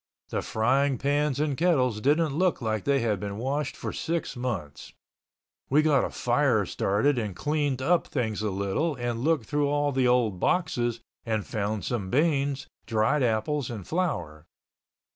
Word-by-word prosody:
The -, -, -1 dB
frying 130 Hz, +5 st, +1 dB
pans 145 Hz, +1 st, 0 dB
and 150 Hz, -2 st, 0 dB
kettles 130 Hz, -9 st, +2 dB
didn't 150 Hz, +3 st, +2 dB
look 180 Hz, +4 st, +1 dB
like 110 Hz, -3 st, -2 dB
they 140 Hz, -2 st, +2 dB
had 105 Hz, -4 st, 0 dB
been 100 Hz, 0 st, -5 dB
washed 140 Hz, +6 st, -2 dB
for -, -, -5 dB
six 165 Hz, -3 st, -2 dB
months. 120 Hz, -, -5 dB, 0.8 s
We 150 Hz, +3 st, +4 dB
got 145 Hz, -4 st, +3 dB
a -, -, -1 dB
fire -, -, +1 dB
started 120 Hz, +7 st, +1 dB
and 105 Hz, -5 st, -4 dB
cleaned 145 Hz, -, -1 dB
up 175 Hz, +4 st, +2 dB
things 110 Hz, -6 st, -2 dB
a 110 Hz, -, 0 dB
little 100 Hz, -, -1 dB
and 120 Hz, -2 st, -3 dB
looked 150 Hz, -2 st, +1 dB
through 145 Hz, +2 st, 0 dB
all 145 Hz, 0 st, +1 dB
the 130 Hz, -2 st, +2 dB
old 120 Hz, -7 st, +2 dB
boxes 120 Hz, -, 0 dB, 0.2 s
and 110 Hz, -3 st, -1 dB
found 105 Hz, -3 st, -2 dB
some 105 Hz, -6 st, -2 dB
beans, 140 Hz, -, +1 dB, 0.2 s
dried 115 Hz, +7 st, +2 dB
apples 125 Hz, +4 st, 0 dB
and 110 Hz, -6 st, -6 dB
flour. 85 Hz, -, -2 dB
130 Hz, 160 wpm, -27 LUFS, 110-145 Hz, 0.8 s, We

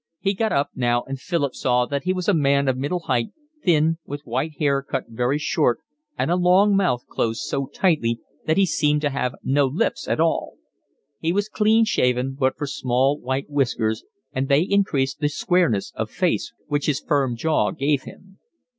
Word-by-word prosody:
He 195 Hz, 0 st, 0 dB
got 220 Hz, +2 st, -1 dB
up 140 Hz, 0 st, +1 dB
now, 120 Hz, -1 st, +1 dB
and 135 Hz, 0 st, -6 dB
Philip 145 Hz, -3 st, -1 dB
saw 125 Hz, -1 st, +1 dB
that 140 Hz, +1 st, -3 dB
he 185 Hz, -, +2 dB
was 185 Hz, -1 st, -3 dB
a 205 Hz, -, +4 dB
man 140 Hz, -3 st, +2 dB
of 130 Hz, -, +2 dB
middle 145 Hz, +7 st, -2 dB
height, 120 Hz, -7 st, -1 dB, 0.3 s
thin, 165 Hz, -1 st, +3 dB
with 145 Hz, +1 st, -7 dB
white 130 Hz, +6 st, -2 dB
hair 140 Hz, -2 st, +1 dB
cut 135 Hz, -, -3 dB
very 125 Hz, +5 st, 0 dB
short 125 Hz, -4 st, +1 dB, 0.4 s
and -, -, 0 dB
a -, -, +3 dB
long 185 Hz, +3 st, +4 dB
mouth 175 Hz, -11 st, +1 dB
closed 115 Hz, -1 st, -2 dB
so 135 Hz, -1 st, -2 dB
tightly 140 Hz, -8 st, +1 dB, 0.3 s
that 160 Hz, -, +2 dB
he 195 Hz, -, +5 dB
seemed 150 Hz, -3 st, +1 dB
to 145 Hz, -2 st, 0 dB
have 125 Hz, -2 st, -2 dB
no 140 Hz, +1 st, +2 dB
lips 130 Hz, -, -1 dB
at -, -, 0 dB
all; -, -, 0 dB, 0.6 s
he 165 Hz, -, 0 dB
was 205 Hz, +3 st, 0 dB
clean 220 Hz, +1 st, +3 dB
shaven 125 Hz, -, +1 dB
but 130 Hz, -1 st, 0 dB
for 145 Hz, -, -3 dB
small 135 Hz, +1 st, 0 dB
white 130 Hz, +2 st, -3 dB
whiskers, 120 Hz, -6 st, 0 dB, 0.3 s
and 130 Hz, +1 st, -1 dB
they 140 Hz, +2 st, +4 dB
increased 170 Hz, -10 st, 0 dB
the 145 Hz, -1 st, +1 dB
squareness 150 Hz, -, +1 dB
of -, -, -3 dB
face -, -, -1 dB
which 145 Hz, -1 st, -1 dB
his 145 Hz, -3 st, +1 dB
firm 135 Hz, -5 st, 0 dB
jaw 115 Hz, -5 st, +1 dB
gave 140 Hz, +6 st, 0 dB
him. 195 Hz, +6 st, -14 dB
140 Hz, 190 wpm, -23 LUFS, 130-170 Hz, 0.6 s, he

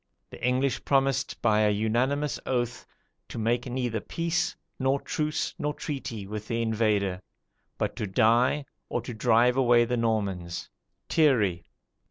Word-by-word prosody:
The -, -, -11 dB
English 130 Hz, +2 st, +1 dB
promised 135 Hz, -2 st, +1 dB
by 110 Hz, -2 st, +4 dB
a 105 Hz, -1 st, +4 dB
unanimous 120 Hz, +8 st, 0 dB
oath, 120 Hz, -2 st, -2 dB, 0.4 s
to -, -, -7 dB
make 120 Hz, +3 st, 0 dB
neither 120 Hz, -3 st, -1 dB
peace, 170 Hz, +8 st, -1 dB, 0.2 s
nor 135 Hz, +1 st, +2 dB
truce 155 Hz, +2 st, -2 dB
nor 150 Hz, 0 st, -1 dB
treaty, 130 Hz, -8 st, -5 dB
with 105 Hz, +1 st, -6 dB
the 115 Hz, -, -1 dB
invader, 105 Hz, -4 st, +1 dB, 0.6 s
but -, -, -2 dB
to 105 Hz, -, -2 dB
die, 120 Hz, +8 st, +3 dB, 0.2 s
or -, -, -1 dB
drive 120 Hz, +2 st, +2 dB
away 120 Hz, -2 st, +5 dB
the 125 Hz, +1 st, -1 dB
Normans." 100 Hz, -7 st, -2 dB, 0.4 s
[Thierry. 105 Hz, -, +2 dB
120 Hz, 135 wpm, -27 LUFS, 110-135 Hz, 0.6 s, away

